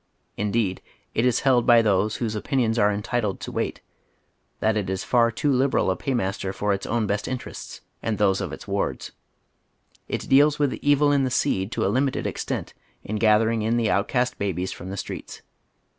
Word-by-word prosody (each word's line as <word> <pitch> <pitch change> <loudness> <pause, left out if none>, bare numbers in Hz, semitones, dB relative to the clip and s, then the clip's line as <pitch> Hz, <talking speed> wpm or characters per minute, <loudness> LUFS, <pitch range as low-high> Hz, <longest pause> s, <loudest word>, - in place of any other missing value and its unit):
Indeed, 105 -2 -1 0.3
it 120 - +2
is 125 - +1
held 130 -4 +3
by 120 -2 +7
those 105 +1 +2
whose 115 -3 -2
opinions 115 +1 0
are 105 -1 +4
entitled 105 0 -2
to - - -6
weight - - -3 0.8
tliat 110 0 +1
it 100 -3 -1
is 95 0 -2
far 120 -2 +3
too 140 +6 0
liberal 130 -6 +2
a - - 0
paymaster 95 -7 -2
for 100 +1 0
its 100 0 -4
own 115 0 0
best 100 0 -2
interests 130 -1 -6 0.2
and 110 -2 -1
those 95 -2 +2
of - - -4
its - - -9
wards. - - -2 1.0
It - - -4
deals 145 +2 +5
with 145 -3 +1
the - - -5
evil 145 0 +4
in 140 -1 +3
the 130 - +1
seed 95 -4 0
to - - 0
a 100 - +1
limited 135 +1 0
extent - - -3 0.3
in 110 - -3
gathering 110 +1 +3
in 115 +2 +1
the 115 -2 +1
outcast 125 +5 0
babies 95 -2 -2
from 90 - -8
the 100 - -5
streets. - - -7
110 Hz, 190 wpm, -24 LUFS, 100-125 Hz, 1.0 s, by